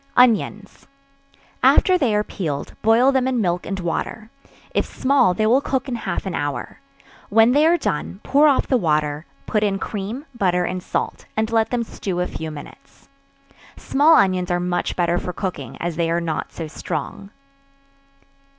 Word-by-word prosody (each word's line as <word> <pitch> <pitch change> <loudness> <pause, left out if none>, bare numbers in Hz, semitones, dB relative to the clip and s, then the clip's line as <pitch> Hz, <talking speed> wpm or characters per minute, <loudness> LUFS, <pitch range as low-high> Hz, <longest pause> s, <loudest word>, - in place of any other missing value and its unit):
Onions. 220 -4 +2 0.7
After 370 - +5
they 255 -12 +1
are 210 - +2
peeled, 155 -9 -4
boil 235 +5 +4
them 260 -1 +1
in 255 -2 0
milk 175 -4 -1
and 195 -1 -3
water; 185 +5 -4 0.4
if - - +2
small, 260 -9 +2
they 215 - +1
will 245 +5 +4
cook 265 -2 -2
in 255 - -3
half 235 - -3
an 190 - -3
hour; 145 -5 -4 0.5
when 225 +3 +5
they 295 +4 +4
are 345 +1 +4
done, 185 - -3
pour 290 +2 +4
off 280 -3 +3
the 260 - +2
water; 150 -3 0 0.2
put 210 - 0
in 200 -2 +1
cream, 215 +8 -5
butter 180 -5 +1
and 185 +1 -3
salt, - - -4
and 220 +1 0
let 225 -1 +2
them 245 -1 -1
stew 190 -5 -4
a 180 - +1
few 160 -2 -6
minutes. 155 - -13 0.7
Small 300 +4 +4
onions 185 - +2
are 175 0 +1
much 175 0 -2
better 175 0 +1
for 180 - -5
cooking, 190 -1 -5
as 170 -2 -3
they 170 -1 0
are 170 +1 +1
not 165 -2 -3
so 165 - -6
strong. 195 +5 -5
200 Hz, 175 wpm, -21 LUFS, 175-245 Hz, 0.7 s, After